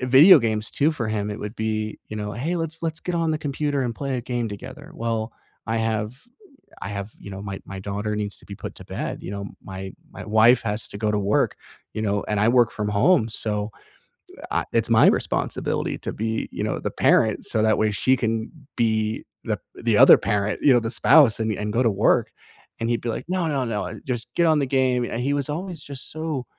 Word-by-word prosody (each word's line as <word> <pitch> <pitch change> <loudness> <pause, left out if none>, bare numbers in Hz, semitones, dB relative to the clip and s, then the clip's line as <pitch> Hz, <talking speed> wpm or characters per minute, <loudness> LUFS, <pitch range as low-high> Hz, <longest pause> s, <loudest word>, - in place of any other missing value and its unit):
video 135 +8 +8
games 110 -3 -1
too 150 +3 +2
for 120 -7 -3
him 105 -1 -2
it 105 - -5
would 105 +1 -5
be, 110 -1 -2
you 110 - -6
know, 105 -1 -4
"Hey, 145 +11 -2
let's 165 -1 -3
let's 160 -1 -3
get 180 - -3
on 165 -1 +1
the 155 - 0
computer, 145 -1 -1
and 120 -2 -2
play 135 0 -3
a - - -2
game 120 -1 -2
together." 130 +9 -9
Well, 115 -5 -2 0.3
I 115 0 -1
have 110 +2 -2 0.6
I - - -4
have, 100 +1 -5
you - - -10
know, 95 0 -7
my 100 -1 -6
my 95 0 -7
daughter 105 +2 -3
needs 105 -1 -3
to - - -16
be 100 - -8
put - - -8
to - - -12
bed, - - -5
you - - -6
know, 100 0 -5 0.2
my 95 0 -7 0.2
my - - -9
wife 110 +3 +5
has 105 -1 -2
to - - -7
go 105 0 0
to 105 - 0
work, 100 +1 +1 0.4
you 110 - -3
know, 100 -1 0
and 105 -1 +1
I 105 - +3
work 120 -2 +4
from 105 -1 -3
home, 110 - +3
so, 105 -1 -2 0.8
I - - 0
It's - - +1
my - - +6
responsibility - - 0
to - - -5
be, 110 +1 -2
you - - -4
know, - - -1
the - - -3
parent - - +2
so 110 - +1
that 110 0 +3
way 110 0 +2
she 130 +6 +2
can 115 -1 -1 0.3
be 110 -2 0 0.2
the - - -1 0.2
the - - +1
other - - +9
parent, 105 +1 -1
you 140 - +6
know, 120 - +5
the 115 0 -3
spouse 135 -2 +5
and 110 0 0
and 105 +1 -3
go 120 +3 +2
to 115 - +3
work. 100 - +2 0.5
And 115 +1 -1
he'd 120 - +1
be 120 - -5
like, 115 - -3
"No, 180 -2 0
no, 140 -4 0
no, 110 -4 -2
uh, - - -6
just 120 -4 -3
get 170 - +3
on 160 -2 +4
the 140 - 0
game," 130 -2 +2
and 120 - -3
he 135 +3 0
was 140 -1 -1
always 170 +2 -4
just 140 -2 -7
so 155 -4 -3
115 Hz, 235 wpm, -23 LUFS, 105-135 Hz, 0.8 s, other